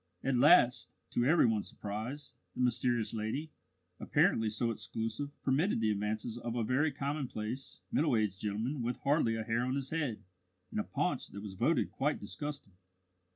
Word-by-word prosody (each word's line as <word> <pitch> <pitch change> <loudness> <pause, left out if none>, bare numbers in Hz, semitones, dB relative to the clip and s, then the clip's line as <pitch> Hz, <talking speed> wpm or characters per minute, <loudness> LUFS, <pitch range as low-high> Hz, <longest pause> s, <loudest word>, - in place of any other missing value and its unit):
At 135 -1 +1
last, 120 0 +5 0.2
to 120 - +1
every 160 +5 +5
one's 110 -3 +1
surprise, 110 +8 -5 0.2
the - - -2
mysterious 120 -2 +1
lady, 115 +8 -3 0.5
apparently 110 -1 +3
so 115 +2 0
exclusive, 115 +5 -3
permitted 140 - +2
the 110 -1 +2
advances 110 +3 -2
of 120 0 -4
a 120 - +1
very 135 +7 +2
commonplace, 135 -4 -4
middle 145 -6 +3
aged 105 -3 0
gentleman 110 +7 -2
with 120 +1 -1
hardly 140 -5 +2
a 110 - -2
hair 115 +1 0
on 130 +2 0
his 135 -1 -3
head 150 -9 -2 0.5
and - - -2
a - - +1
paunch - - -1
that 100 - -8
was 100 -2 -6
voted 120 - +1
quite 145 +2 0
disgusting. 145 -9 -6
120 Hz, 165 wpm, -33 LUFS, 110-140 Hz, 0.5 s, last